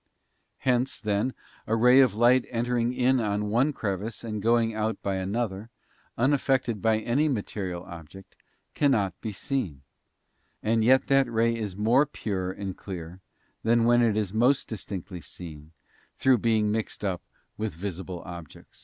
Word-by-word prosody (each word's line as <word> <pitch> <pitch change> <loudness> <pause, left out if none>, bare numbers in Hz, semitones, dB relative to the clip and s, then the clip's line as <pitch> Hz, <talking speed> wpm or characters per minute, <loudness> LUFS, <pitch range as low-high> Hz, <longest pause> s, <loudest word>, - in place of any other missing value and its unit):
Hence, 125 0 0
then, 105 +4 -1 0.3
a 110 - +1
ray 125 +3 +6
of 125 -7 +5
light 120 +3 +4
entering 120 0 0
in 130 +1 +2
by 105 -4 0
one 115 +8 +1
crevice 105 -2 -4
and 110 -2 -4
going 115 +1 +2
out 110 +1 -1
by 100 -1 -1
another, 100 +2 -3 0.5
unaffected 130 -4 +1
by 110 -1 +3
any 120 +8 +1
material 100 -7 -3
object, 85 +2 -12 0.4
cannot 110 - +2
be 110 - -4
seen; 100 - -3 0.8
and 110 0 +2
yet 130 +3 +5
that 135 -3 +3
ray 115 +1 +2
is 105 -5 -4
more 120 +8 +3
pure 95 -9 -3
and 95 -1 -5
clear 90 -1 -8 0.4
than 115 +1 +3
when 120 +1 +5
it 110 -3 +2
is 105 -3 -1
most 125 +5 +3
distinctly 95 -4 -6
seen 80 -4 -10 0.5
through 130 -3 +4
being 110 -1 +2
mixed 110 -1 -3
up 95 -3 -1 0.3
with 110 -5 -4
visible 90 0 -5
objects. 85 -4 -11
110 Hz, 150 wpm, -27 LUFS, 95-120 Hz, 0.8 s, ray